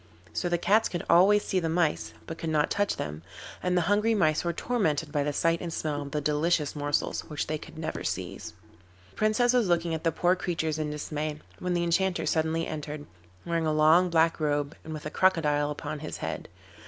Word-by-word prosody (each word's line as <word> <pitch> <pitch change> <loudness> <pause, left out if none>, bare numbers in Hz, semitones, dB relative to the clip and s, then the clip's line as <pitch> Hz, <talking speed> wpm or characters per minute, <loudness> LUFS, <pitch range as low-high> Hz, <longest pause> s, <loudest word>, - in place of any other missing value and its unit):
So 175 - -1
the 175 - +2
cats 210 +6 +3
could 175 - -4
always 200 +4 +6
see 190 - 0
the 165 -2 -1
mice, 165 -2 0
but 165 - -7
could 165 - -3
not 150 -2 +1
touch 205 0 +1
them, 75 +1 -5 0.4
and 180 0 +1
the - - +4
hungry 210 +5 +2
mice 155 -6 +2
were 170 - 0
tormented 165 -7 -1
by 145 -1 +1
the 145 - 0
sight 165 +3 +1
and 170 - -4
smell 150 -2 -2
of 140 - -6
the 150 - -1
delicious 150 +1 +1
morsels 145 0 -1
which 150 -2 -3
they 155 0 -3
could - - -12
never 160 0 -4
seize. - - -4 0.6
The - - -25
Princess 225 +3 +3
was 245 -5 +3
looking 170 -1 +1
at 160 - -3
the 165 - +2
poor 175 +3 +2
creatures 160 -4 -2
in 155 -1 -1
dismay, 150 0 -4 0.2
when 180 -1 -1
the 175 - +1
Enchanter 180 +2 +1
suddenly 160 0 +1
entered, 150 -1 -5 0.4
wearing 165 -1 0
a - - +2
long 160 +4 +5
black 165 0 +3
robe 145 -1 0
and 160 - -8
with 155 -1 -6
a 150 - -4
crocodile 150 -6 +2
upon 150 0 -5
his 155 - -6
head. - - -5
160 Hz, 215 wpm, -28 LUFS, 150-175 Hz, 0.6 s, always